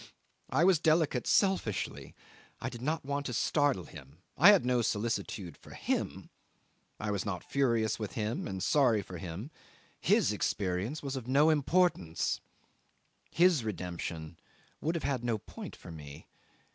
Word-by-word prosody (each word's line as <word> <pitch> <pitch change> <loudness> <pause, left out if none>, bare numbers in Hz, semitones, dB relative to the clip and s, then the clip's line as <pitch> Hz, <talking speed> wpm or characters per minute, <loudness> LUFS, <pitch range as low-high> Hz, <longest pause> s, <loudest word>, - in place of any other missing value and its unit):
I 165 - +2
was 180 -3 +5
delicate 155 -6 +2
selfishly; 115 - 0 0.4
I - - -3
did 120 - -9
not 155 +3 -1
want 140 0 -2
to 125 - -4
startle 140 - +2
him; 75 +2 -13
I - - +8
had 200 -9 +6
no 125 -1 +2
solicitude 105 -6 -2
for - - -14
him; - - -2 0.7
I 105 -1 -2
was 100 -2 -1
not 90 -4 -4
furious 115 -6 +1
with 105 -2 -4
him 110 +1 -2
and 95 -1 -4
sorry 120 -8 +3
for 90 -1 -8
him: 95 - -6 0.5
his - - +3
experience 100 +10 -1
was 135 -1 -3
of 125 -3 -5
no 145 +5 +5
importance, 150 - +1 0.9
his 170 -6 +4
redemption 85 -5 -5 0.4
would 160 +3 0
have 165 - -2
had 135 -3 -1
no 120 -2 0
point - - -9
for - - -11
me. 75 -3 -10
115 Hz, 150 wpm, -31 LUFS, 95-145 Hz, 0.9 s, I